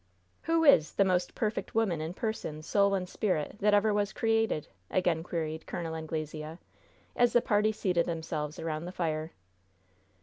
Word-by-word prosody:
"Who 330 0 +3
is 220 - +6
'the 195 - +4
most 180 -1 0
perfect 215 -1 -2
woman 195 -8 +1
in 160 +3 -4
person, 180 -10 -4
soul 200 +3 +3
and 185 -1 -2
spirit 180 -2 -1
that 210 0 +4
ever 210 +1 +3
was 205 0 0
created'?" 225 -8 +1 0.2
again 175 -3 +1
queried 160 -2 -4
Col. 165 -2 -4
Anglesea, 155 0 -5 0.6
as 240 -1 +3
the 240 - +6
party 210 0 +2
seated 180 -5 0
themselves 160 -2 -3
around 160 0 -3
the 180 - -5
fire. 160 -3 -2
180 Hz, 160 wpm, -30 LUFS, 160-210 Hz, 0.6 s, is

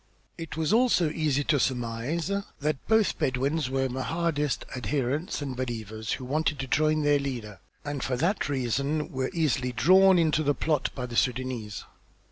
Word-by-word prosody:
It 165 -2 -7
was 160 +4 +1
also 225 -9 +3
easy 150 -3 0
to 145 0 +2
surmise 125 +8 -1 0.3
that 150 -1 -2
both 220 -2 +4
the - - -4
Bedouins 140 +1 0
were 135 0 0
Mahdist 145 +3 -1
adherents 140 +4 -2
and 135 -2 -4
believers, 110 -3 -4
who 130 - -5
wanted 150 +2 0
to 135 - -3
join 155 +3 +2
their 145 -1 +4
leader, 120 -8 -5 0.3
and 145 -2 -3
for 125 -1 -1
that 170 - 0
reason 140 +4 -1
were 130 -2 -2
easily 135 -6 0
drawn 185 +9 +6
into 155 -2 +2
the 145 -2 +1
plot 150 -3 0
by 125 - -3
the 120 - -8
Sudânese. 120 -4 -1
140 Hz, 165 wpm, -27 LUFS, 125-155 Hz, 0.3 s, drawn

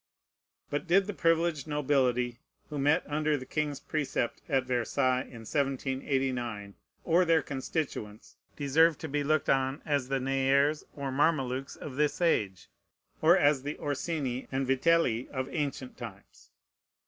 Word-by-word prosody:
But 145 +5 -2
did 190 +3 +4
the 210 - -4
privileged 165 -4 +1
nobility 130 -5 +1 0.3
who 145 - -3
met 145 +5 +3
under 150 0 0
the 130 - -8
king's 150 -1 -2
precept 135 -6 -2
at 135 -1 +2
Versailles 130 +1 +1
in 120 -3 -10
1789, 130 -5 -1 0.3
or 175 +2 +4
their 165 -3 +3
constituents, 130 -6 -4 0.2
deserve 155 +2 +3
to 160 - -6
be 145 0 -1
looked 155 +1 +1
on 135 +1 +1
as 140 -4 0
the 135 0 +1
Nayres 135 +3 +2
or 140 -2 -3
Mamelukes 135 -2 0
of 135 -3 -8
this 150 -1 +1
age, 105 - +1 0.5
or 170 +4 +6
as 145 -5 +3
the 145 +2 -5
Orsini 140 -3 -3
and 135 0 0
Vitelli 135 -2 +2
of 130 -1 -3
ancient 140 -5 -3
times? 105 -5 -11
140 Hz, 140 wpm, -30 LUFS, 130-155 Hz, 0.5 s, or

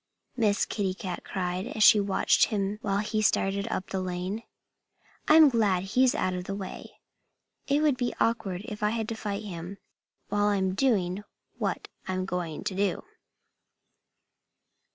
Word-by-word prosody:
Miss 215 -3 +2
Kitty 195 -3 -2
cried, 185 0 -4
as 215 - 0
she 215 - +8
watched 200 -1 +3
him 205 -1 -2
while 195 -2 0
he 215 0 0
started 200 -1 +1
up 185 - -4
the 190 - -1
lane. 185 +4 -3 0.9
"I'm 310 0 +8
glad 210 -8 +2
he's 250 +6 +3
out 185 0 0
of 180 0 -4
the 195 - -4
way. 195 -2 -8 0.7
It 285 +2 +2
would 295 -4 +3
be 245 -1 -1
awkward 200 -5 0
if 210 -1 -7
I 210 - +2
had 220 0 -2
to 225 - -3
fight 210 -1 -4
him 180 -1 -7 0.5
while 205 0 +1
I'm 190 -2 +1
doing 195 -5 +1 0.4
what - - -2 0.2
I'm 185 0 -1
going 175 -4 -4
to - - -2
do." 195 -1 0
200 Hz, 155 wpm, -28 LUFS, 185-220 Hz, 0.9 s, she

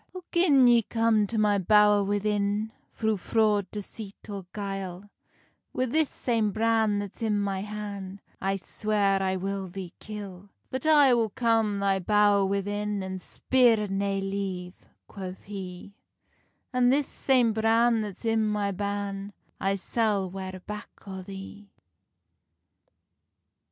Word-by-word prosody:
"Oh, 365 - -7
gin 300 -7 +5
ye 240 -1 +6
come 225 -1 +2
to 225 - -3
my 210 -1 +3
bowr 210 +1 +5
within, 205 +1 0 0.2
Thro 220 -1 0
fraud, 210 0 +1
deceit, 210 0 -8
or 195 -3 -6
guile, 195 -1 -5 0.6
Wi 255 - +1
this 315 0 +2
same 225 -4 0
bran 220 -1 +2
that's 205 +1 -6
in 215 -2 +1
my 195 -1 -1
han 200 -2 -6 0.2
I 195 0 0
swear 200 0 0
I 190 0 0
will 195 +1 -3
thee 185 -1 -8
kill." 200 -2 -8 0.2
"But 260 +3 -3
I 290 -4 +7
will 230 -2 +2
come 225 -2 +1
thy 195 -1 +1
bowr 205 0 +3
within, 205 0 -2
An 190 0 -5
spear 230 0 +2
nae 195 0 -1
leave," 195 -2 -5 0.2
quoth 190 -2 -8
he; 195 -1 -8 0.8
"An 250 -1 +4
this 280 +2 +3
same 250 -5 +2
bran 225 +1 +3
that's 210 +1 -7
i 225 0 +2
my 210 -2 +1
ban, 200 0 -4 0.3
I 195 +1 +1
sall 200 -2 0
ware 190 -1 -6
back 210 0 -6 0.2
on 190 -1 -7
the." 195 +1 -9
205 Hz, 135 wpm, -27 LUFS, 195-220 Hz, 0.8 s, I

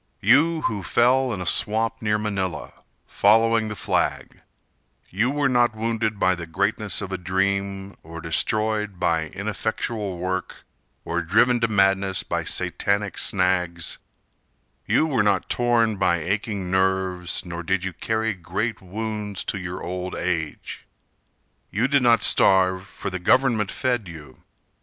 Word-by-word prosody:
You 160 +4 +4
who 105 -7 -2
fell 125 +6 +2
in 95 -5 -4
a - - -4
swamp 110 +5 +2
Near 105 -1 +1
Manila, 95 -10 -3 0.3
following 115 +2 +3
the 105 - -5
flag 90 - -2 0.7
You 110 +7 +1
were 145 0 +1
not 120 -3 +2
wounded 110 -1 -2
by 95 - +3
the 85 -2 -6
greatness 100 +5 -1
of 95 - -6
a 95 - -3
dream, 95 +1 -1
Or 85 +1 -9
destroyed 105 +4 -1
by 85 -3 +1
ineffectual 105 +1 -3
work, 95 +1 -4 0.4
Or 85 +1 -1
driven 120 +8 +3
to 115 - +2
madness 95 -2 +2
by - - -2
Satanic 100 0 -1
snags; 90 -3 0 0.9
You - - +3
were 135 -8 +1
not 100 -2 +1
torn 115 -3 +2
by 90 -2 +2
aching 100 +2 -3
nerves, 95 -2 0
Nor 85 -1 -5
did 95 +1 -1
you 95 -1 -3
carry 110 +4 -1
great 95 +6 -4
wounds 105 +1 -4
to 100 - -3
your 90 -1 -6
old 90 +1 -4
age. 85 -4 -4 0.8
You 115 +5 0
did 140 -1 +3
not 120 -3 +4
starve, 95 0 +3
for - - -6
the 90 - -4
government 115 0 +2
fed 120 -6 -1
you. 75 -5 -12
100 Hz, 145 wpm, -23 LUFS, 90-110 Hz, 0.9 s, You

